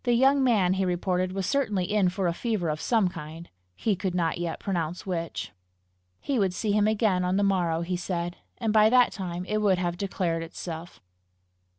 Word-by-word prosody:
The 245 - +2
young 270 +3 +4
man, 205 -8 +3
he 190 0 0
reported, 180 +1 0
was 195 0 -2
certainly 215 -9 0
in 200 -4 +3
for 185 +1 -2
a 170 - +1
fever 210 -4 -1
of 150 0 -2
some 225 -5 +2
kind 165 -1 -8 0.3
he 215 - 0
could 185 0 -3
not 170 -1 0
yet 170 -1 -3
pronounce 175 -3 -3
which. 170 - -4 0.7
He 275 -4 -1
would 190 -3 +1
see 215 +1 -1
him 210 0 +3
again 210 -4 +2
on 180 +1 +1
the 205 - +2
morrow, 175 -4 +1
he 180 +1 -2
said, 175 -1 -3 0.2
and 220 -2 -1
by 215 0 +6
that 250 +1 +5
time 180 -2 -5
it 215 +3 -1
would 200 -3 +3
have 175 -1 -2
declared 180 -4 -1
itself. 165 +1 -7
185 Hz, 200 wpm, -27 LUFS, 175-210 Hz, 0.7 s, by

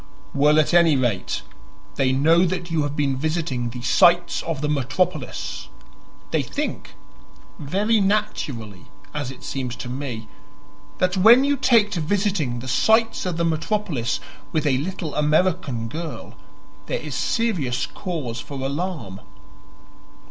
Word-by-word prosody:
"Well, 150 +2 +4
at 155 - +2
any 170 -3 +6
rate, 120 -8 -1 0.5
they 135 -2 +1
know 160 +6 +4
that 180 -1 -2
you 165 -2 +1
have 145 0 -2
been 140 -2 +1
visiting 145 -4 -1
the 120 0 -8
'sights 175 +6 +4
of 160 -4 -3
the 150 - 0
metropolis.' 135 - -2 0.6
They - - +2
think - - -4 0.6
very 205 +9 +1
naturally, 135 - -2 0.3
as 145 -3 -3
it 130 -1 -11
seems 125 -3 -4
to 125 - -7
me 125 -4 -5 0.7
that 185 +1 +1
when 230 +7 +7
you 285 +1 +2
take 230 -6 +4
to 175 - -2
visiting 170 - 0
the 130 - -8
sights 220 - +2
of 175 -2 -2
the 170 - +1
metropolis 165 - -1 0.3
with 155 0 0
a 130 -3 +2
little 170 0 -4
American 150 -5 +1
girl, 160 +6 -6 0.5
there - - -1
is - - -6
serious 185 - 0
cause 150 - -5
for 145 -1 -8
alarm." 140 - -4
155 Hz, 140 wpm, -23 LUFS, 130-185 Hz, 0.7 s, when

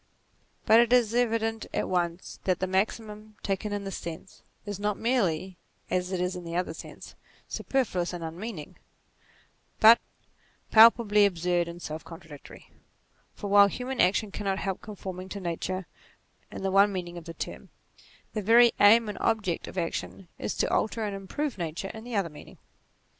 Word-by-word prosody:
But 225 - +7
it 235 0 +3
is 240 -3 +4
evident 225 -2 0
at - - 0
once 175 -1 -2
that 185 -2 +2
the 185 - 0
maxim, 210 +2 -2
taken 200 +1 -2
in 205 0 -3
this 195 -1 -5
sense, 170 +2 -9 0.2
is 205 -2 -5
not 210 0 -1
merely, 190 -7 0 0.3
as 180 0 0
it 185 - -1
is 180 +1 -1
in 180 - -7
the 170 0 -6
other 180 -2 -1
sense, - - -11 0.3
superfluous 195 -10 -1
and 175 -2 -6
unmeaning, 165 0 -7 1.0
but 225 +2 +8 0.7
palpably 220 -2 +7
absurd 175 -1 0
and 170 0 -8
self 155 +1 -6
contradictory. 160 -4 -13 0.6
For 205 - -6
while 200 0 +7
human 250 +5 -2
action 200 +3 +2
cannot 195 -2 -2
help 195 -1 -3
conforming 190 -3 -7
to 200 - -6
Nature 185 +1 -3 0.6
in - - -8
the 195 - 0
one 200 +1 +5
meaning 175 -2 -5
of 165 - -16
the 165 - -8
term, - - -7 0.6
the 215 - -2
very 230 +3 +6
aim 225 +2 +6
and 210 - -5
ob 225 -1 +1
ject 175 -4 -3
of - - -9
action 175 +1 -4
is - - -3
to - - 0
alter 220 +1 0
and 205 -2 -3
improve 215 +6 -4
Nature 170 +3 -4
in 220 - -9
the 245 -2 -5
other 195 -4 +1
meaning. 150 - -13
195 Hz, 170 wpm, -28 LUFS, 180-220 Hz, 1.0 s, but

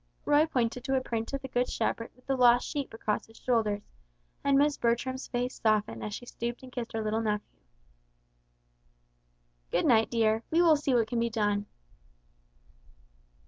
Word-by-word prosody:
Roy 295 +2 +4
pointed 245 -4 -1
to 270 - +1
a 260 - +2
print 225 -3 -3
of 275 -1 -4
the - - -4
Good 245 0 0
Shepherd 230 - -2
with 250 - -25
the 270 - 0
lost 245 -1 +5
sheep 285 -2 -3
across 215 -1 -2
his 225 - -18
shoulders, 215 -4 0 0.6
and 280 -1 +4
Miss 290 +1 +3
Bertram's 260 +2 -1
face 245 0 -3
softened 215 -2 +1
as 210 - -4
she 245 - -8
stooped 240 +1 -5
and 255 - -11
kissed 245 -2 -5
her 220 -1 -2
little 215 +1 0
nephew. 210 -2 -1 2.2
"Good - - +1
night 225 -2 +4
dear. 220 -1 +2
We 330 - +2
will 325 -2 +6
see 285 -3 0
what 230 -2 +3
can 235 +1 -1
be 235 0 +1
done." 205 -2 0
240 Hz, 175 wpm, -29 LUFS, 220-260 Hz, 2.2 s, will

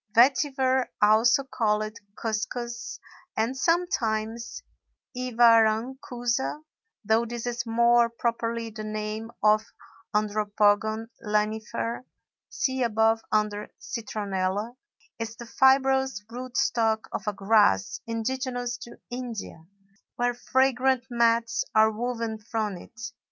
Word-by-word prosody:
Vetiver, 260 0 +4
also 220 +6 +5
called 215 -4 -1 0.2
cuscus, 235 +2 -4 0.4
and 230 +4 0
sometimes 235 - -1 0.5
iwarankusa 240 +2 +2 0.4
(though 220 +2 +3
this 235 0 -5
is 240 0 -3
more 235 +1 +4
properly 230 -1 -2
the 215 0 -7
name 215 +1 -4
of 215 0 +5 0.5
Andropogon 210 +1 +1 0.2
lanifer; 220 +3 -1 0.5
see 260 -1 -1
above, 225 -1 +2
under 210 -1 0
Citronella), 205 -1 -3 0.4
is 225 0 -4
the 235 - -9
fibrous 265 -2 +3
root 250 +1 -6
stock 225 -5 +1
of - - -5
a 210 - +1
grass 200 - +3
indigenous 245 +1 -2
to 235 - -11
India, 235 -9 -6 0.5
where 245 0 +1
fragrant 260 0 +2
mats 230 -1 +2
are 220 0 +6
woven 230 -1 -3
from 215 -2 -3
it. 220 +5 -13
230 Hz, 100 wpm, -26 LUFS, 215-245 Hz, 0.5 s, are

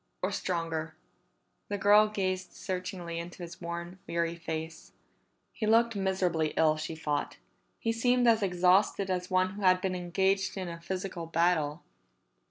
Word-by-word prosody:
Or 185 - +1
stronger." 165 -4 -2 0.7
The 205 - -1
girl 205 +2 +6
gazed 185 -3 -2
searchingly 180 -2 -4
into 175 +2 -7
his 170 +1 -9
worn, 170 +2 -5
weary 170 0 -1
face. 160 -1 -6 0.6
He 215 - -2
looked 230 +1 +4
miserably 185 -5 0
ill, 155 -1 +4
she 155 +1 -4
thought; 150 -2 -2 0.4
he 225 - -1
seemed 245 +2 +2
as 225 -1 +5
exhausted 185 +1 +3
as 180 0 -2
one 185 0 +2
who 205 +2 -8
had 185 -1 +5
been 185 0 -1
engaged 190 +2 0
in 185 -1 -3
a 170 0 -8
physical 185 -1 -4
battle. 165 -2 +1
180 Hz, 150 wpm, -30 LUFS, 170-195 Hz, 0.7 s, girl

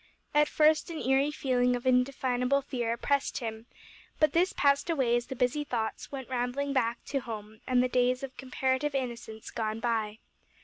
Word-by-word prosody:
At 295 0 +5
first 310 +1 +3
an 330 - -5
eerie 270 +1 +2
feeling 250 -4 +1
of 245 - -6
indefinable 255 +1 +2
fear 240 -4 -2
oppressed 280 +4 0
him, 225 -1 -5 0.5
but 305 - +4
this 360 +3 +3
passed 280 +3 +2
away 265 -7 +2
as 240 0 -1
the 265 - -5
busy 250 +4 +1
thoughts 230 -6 -3
went 265 -3 -6
rambling 255 +3 -1
back 235 -3 +1
to 275 - -1
home 215 -3 -8
and 250 -1 +3
the - - +2
days 250 +1 +1
of 265 -1 -6
comparative 265 +2 -1
innocence 235 -4 -5
gone 220 -2 -2
by. 220 -3 -1
255 Hz, 175 wpm, -29 LUFS, 240-275 Hz, 0.5 s, At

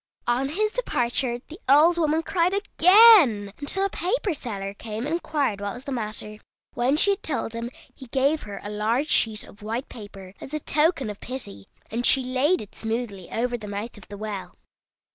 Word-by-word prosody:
On 250 +3 0
his 425 +7 0
departure 245 - -1
the 325 +4 -11
old 320 +5 +6
woman 315 0 +1
cried 360 +1 +1
again, 365 - +6
until 380 +7 0
a - - 0
paper 380 +1 -1
seller 200 -8 -5
came 220 +3 -6
and 300 - -2
inquired 285 - -1
what 200 +1 -4
was 245 - -9
the 280 - -6
matter. 215 -3 -5 0.3
When 255 +5 +1
she 400 - +6
had 395 - -2
told 270 -6 -3
him, 230 +1 -4 0.2
he 260 - -12
gave 280 +5 +1
her 205 -1 -8
a 205 - -6
large 225 +8 0
sheet 215 -2 +2
of 205 - -16
white 225 +5 -4
paper, 195 -4 -11
as 290 - -6
a - - -1
token 300 -5 +1
of 205 - -11
pity, 170 - -6 0.2
and 235 +2 -2
she 265 +1 +5
laid 260 +7 +1
it 205 - -16
smoothly 220 -5 -4
over 240 +1 -1
the 210 - -8
mouth 205 +3 -5
of 205 - -15
the 205 - -9
well. 210 -2 -6
245 Hz, 195 wpm, -24 LUFS, 215-310 Hz, 0.3 s, old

